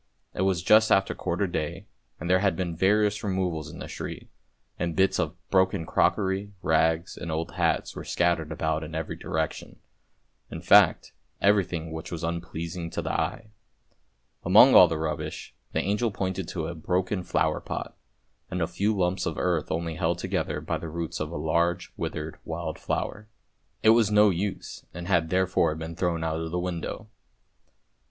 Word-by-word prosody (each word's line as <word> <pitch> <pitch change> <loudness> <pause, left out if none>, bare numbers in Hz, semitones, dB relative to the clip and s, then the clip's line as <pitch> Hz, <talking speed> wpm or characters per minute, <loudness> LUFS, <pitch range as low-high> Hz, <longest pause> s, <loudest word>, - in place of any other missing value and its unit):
It - - -3
was 95 -3 +1
just 110 +1 +5
after 95 0 +3
quarter 90 +3 -1
day, 85 -4 -3 0.3
and 85 - -5
there 90 +1 +4
had 95 -3 +2
been 85 -1 -3
various 105 +4 +2
removals 90 -6 -1
in - - -10
the - - -7
street, - - -7 0.5
and 85 -1 -1
bits 95 0 +3
of 80 +2 -1 0.2
broken 95 -2 +2
crockery, 95 +4 +1
rags, 80 +1 +2
and 85 - -6
old 80 +1 -2
hats - - 0
were - - -6
scattered 85 -3 0
about 80 0 -1
in 80 +1 -7
every 80 -1 -3
direction, 80 -1 -3 0.7
in - - -6
fact - - +5 0.3
everything 90 -5 +1
which 80 0 -6
was 85 -1 -5
unpleasing 85 0 -4
to - - -4
the - - -2
eye. 110 -2 -2 0.9
Among - - +7
all - - +9
the 80 - -2
rubbish, 80 -1 -4 0.2
the - - 0
angel 105 +4 +1
pointed 95 -3 -3
to 85 -2 -3
a 85 - -4
broken 90 +4 -1
flower - - 0
pot - - -6 0.5
and 90 - -3
a 85 - +2
few 100 +5 -1
lumps 90 0 0
of 80 - -3
earth 90 -4 0
only 85 0 -2
held 85 -1 0
together - - -2
by - - -2
the 80 - -6
roots 85 0 -4
of - - -3
a - - -5
large 85 +1 0
withered 80 -1 -5
wild 80 -1 -5
flower. 105 +1 -3 0.6
It 110 - +6
was 115 -2 +5
no 105 -1 +5
use 95 +2 -4
and 85 0 -6
had 85 -4 +2
there 95 +1 +3
fore 90 -4 +1
been 80 +1 -6
thrown 85 -2 -1
out 80 0 -1
of 80 - -4
the 90 - -2
window. 90 +4 -4
85 Hz, 175 wpm, -27 LUFS, 80-95 Hz, 0.9 s, all